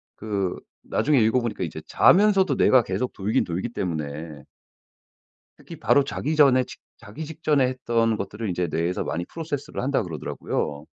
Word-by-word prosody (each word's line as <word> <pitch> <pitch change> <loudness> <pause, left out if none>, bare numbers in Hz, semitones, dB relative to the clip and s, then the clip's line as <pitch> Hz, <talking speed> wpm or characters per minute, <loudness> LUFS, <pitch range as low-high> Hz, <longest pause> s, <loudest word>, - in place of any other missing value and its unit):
그 100 -4 -2 0.3
나중에 145 -3 +2
읽어보니까 115 +1 +1
이제 - - -5
자면서도 195 -1 +4
뇌가 130 -3 +5
계속 100 +7 -2
돌긴 105 +3 0
돌기 90 +7 -3
때문에 80 - -5 1.1
특히 - - -11
바로 140 - +4
자기 150 +3 -3
전에 135 -4 +5
직 - - -12 0.2
자기 150 +10 -8
직전에 150 -4 +1
했던 115 -3 0
것들을 105 +2 -4
이제 90 -1 -1
뇌에서 85 +3 -1
많이 85 +1 -3
process를 150 - -5
한다 135 +2 +1
그러더라고요. 75 -3 -4
115 Hz, 370 characters per minute, -24 LUFS, 90-140 Hz, 1.1 s, 뇌가